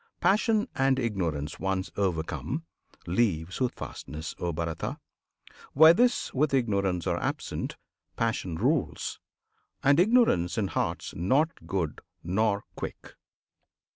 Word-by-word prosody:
Passion 215 +2 +3
and 135 0 +3
Ignorance, 85 - -2
once 95 -1 -1
overcome, 85 - -2 0.4
Leave 90 -3 0
Soothfastness, 80 - -4
O 85 - -1
Bharata! 85 0 -3 0.8
Where 160 +3 +9
this 245 +6 +2
With 140 +1 +2
Ignorance 100 -8 +1
are - - 0
absent, - - -3 0.4
Passion 110 -7 -1
rules; 130 - 0 0.6
And 140 +3 +5
Ignorance 185 - +4
in 100 -4 0
hearts - - -2
not 135 - +1
good 85 -6 -2 0.2
nor 100 +3 +1
quick. - - -7
100 Hz, 105 wpm, -28 LUFS, 85-140 Hz, 0.8 s, Where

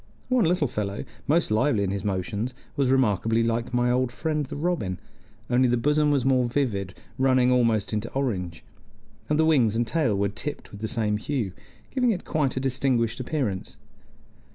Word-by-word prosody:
One 250 -6 +3
little 165 -3 +2
fellow, 100 -3 -3 0.2
most 160 -4 +2
lively 110 -1 +2
in 95 - -1
his 100 -1 -3
motions, 105 +5 -2 0.2
was 135 -2 +1
remarkably 115 -3 +2
like 115 +1 -1
my 120 0 +2
old 125 0 +1
friend 155 +3 -1
the - - -6
robin, 145 - -1 0.5
only 125 +1 +3
the 120 0 +2
bosom 150 +4 +2
was 140 -4 +2
more 130 -2 +3
vivid, 105 -8 -1 0.2
running 130 -1 +4
almost 115 -4 +2
into 105 +2 -2
orange, 95 - -2 0.7
and 150 - +2
the 160 - +4
wings 125 -9 +3
and 120 +1 +1
tail 130 -6 +1
were 100 0 +1
tipped 145 +9 -6
with 100 - -10
the 110 - -1
same 110 -3 0
hue, 115 -3 -2 0.4
giving 250 -2 +2
it 190 -5 -1
quite 145 -5 0
a - - +2
distinguished 130 -3 0
appearance. 125 -8 -3
125 Hz, 175 wpm, -25 LUFS, 105-145 Hz, 0.7 s, running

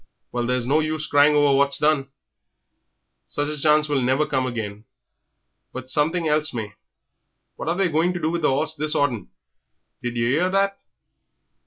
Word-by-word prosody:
Well, 120 -1 -2
there's 125 -1 0
no 145 +5 +2
use 155 0 -2
crying 145 +1 +4
over 145 -2 +4
what's 140 0 +2
done 150 -2 +1 1.2
sich 145 0 -2
a 150 - -3
chance 150 0 +3
won't 140 +1 0
come 130 -1 0
again, 110 -3 -5 0.9
but 130 0 -3
something 160 +4 +1
else 150 -2 +1
may. 105 -3 -5 0.8
What - - -5
are 170 - 0
they 195 0 +1
going 165 +2 +1
to 175 - -4
do 160 -1 -1
with 170 0 -2
the 150 - +2
'orse 155 +4 +1
this 155 0 -2
autumn 125 -9 -1 0.7
did 120 -1 -4
yer 115 - +1
'ear 160 +9 +1
that?" 195 +1 0
145 Hz, 170 wpm, -23 LUFS, 130-155 Hz, 1.2 s, crying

